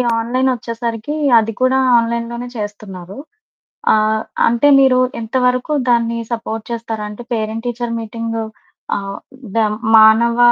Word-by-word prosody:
ఈ - - +3 0.2
ఆన్లైన్ 255 +3 0
వచ్చేసరికి 230 +3 -4 0.2
అది 225 0 -1
కూడా 255 +1 +3 0.2
ఆన్లైన్‌లోనే 235 +1 -3
చేస్తున్నారు. 205 -2 -7 0.8
ఆహ్, 215 0 +1 0.3
అంటే 235 +5 +3
మీరు 260 -2 +4 0.2
ఎంత 225 +2 -8
వరకు 250 +4 0 0.2
దాన్ని 235 -1 +2
సపోర్ట్ 225 -1 -4
చేస్తారా? 225 -2 -4
అంటే 210 +3 -9
పేరెంట్ 220 +1 -3
టీచర్ 240 -1 -3
మీటింగ్ 230 +1 -5 0.6
ఆహ్, 195 0 -5 0.4
దా 225 - +3 0.3
మానవ 220 +2 +5
230 Hz, 125 wpm, -17 LUFS, 220-240 Hz, 0.8 s, మానవ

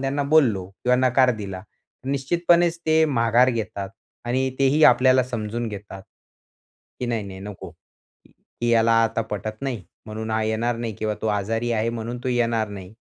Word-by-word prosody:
त्यांना 135 +1 -1
बोललो 110 -12 +3
किंवा 125 +5 0
नकार 130 +1 +4
दिला 95 -3 -6
तर 105 +6 -16
निश्चितपणेच 170 +4 +2
ते 160 0 +4
माघार 120 -3 +3
घेतात. 105 -4 -4 0.4
आणि 130 +2 0
तेही 140 +3 +3
आपल्याला 130 +1 +5
समजून 115 -1 -4
घेतात. 100 -2 -9 1.0
की 125 - -2
नाही-नाही 100 -5 -4
नको. 100 -1 -8
की 120 0 -9
"ह्याला 115 0 +4
आता 115 0 -1
पटत 110 +1 -6
नाही 125 -7 -3 0.2
म्हणून 110 +1 -5
हा 110 0 0
येणार 115 +2 -1
नाही 115 -1 -4
किंवा 110 -1 -1
तो - - -1
आजारी 110 +3 -1
आहे 110 0 0
म्हणून 115 +1 -5
तो - - 0
येणार 115 -3 0
नाही." 100 0 -10
115 Hz, 160 wpm, -23 LUFS, 110-130 Hz, 1.0 s, आपल्याला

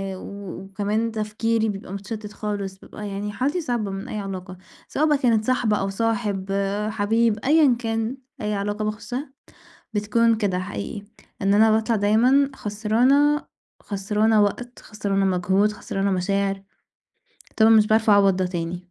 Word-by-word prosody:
و 195 -1 -8
وكمان 210 +3 -2
تفكيري 220 +1 -1
بيبقى 195 -1 -6
متشتت 210 +1 -6
خالص، 200 -2 -4
بيبقى 210 0 -9
يعني 205 +1 -4
حالتي 285 - -1
صعبة 235 -8 -2
من 195 0 -6
أي 215 - -4
علاقة، 185 -2 -6 0.3
سواء 305 - 0
بقى 295 -1 +3
كانت 230 -5 +2
صاحبة 240 -5 +1
أو 195 0 -1
صاحب، 205 -2 -1 0.4
حبيب، 220 +1 +1
أيًا 290 -4 +5
كان، 225 +2 -2 0.2
أي 210 0 -1
علاقة 205 +1 -2
باخشها 250 +6 -5 0.6
بتكون 225 +3 +2
كده 200 -4 0
حقيقي، 185 - -5 0.4
إن 200 +1 +3
أنا 220 +1 +5
باطلع 220 +1 +2
دايمًا 245 +7 +3
خسرانة، 245 +9 +2 0.4
خسرانة 210 +2 +1
وقت، 240 +4 -2
خسرانة 200 -2 -1
مجهود، 190 +3 +2
خسرانة 200 -1 -2
مشاعر، 195 +1 0 0.9
طبعًا 220 0 +5
مش 215 -1 +6
باعرف 220 0 +3
أعوّض 200 -2 +5
ده 185 -1 0
تاني. 175 0 -5
210 Hz, 145 wpm, -23 LUFS, 195-225 Hz, 0.9 s, مش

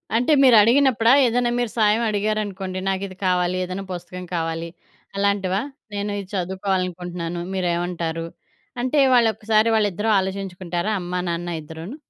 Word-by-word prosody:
అంటే 245 +6 +2
మీరు 255 -3 +7
అడిగినప్పుడా, 235 0 +4
ఏదైనా 240 0 +1
మీరు 240 -3 -1
సాయం 215 0 +3
అడిగారనుకోండి, 205 -3 -2
నాకు 190 0 -1
ఇది 185 - -11
కావాలి 180 0 +1
ఏదైనా 185 +2 -5
పుస్తకం 180 +1 -7
కావాలి 165 0 -2 0.5
అలాంటివా? 200 -1 +1 0.3
నేను 205 0 -2
ఇది 195 - -12
చదువుకోవాలనుకుంటున్నాను 180 -2 -3
మీరేమంటారు 175 -2 -2 0.6
అంటే 255 +4 +1
వాళ్ళొక్కసారి 220 -2 +3
వాళ్ళిద్దరూ 210 0 0
ఆలోచించుకుంటారా? 190 -1 -3
అమ్మా-నాన్న 175 -1 -3
ఇద్దరూను? 160 - -8
190 Hz, 120 wpm, -22 LUFS, 175-215 Hz, 0.6 s, మీరు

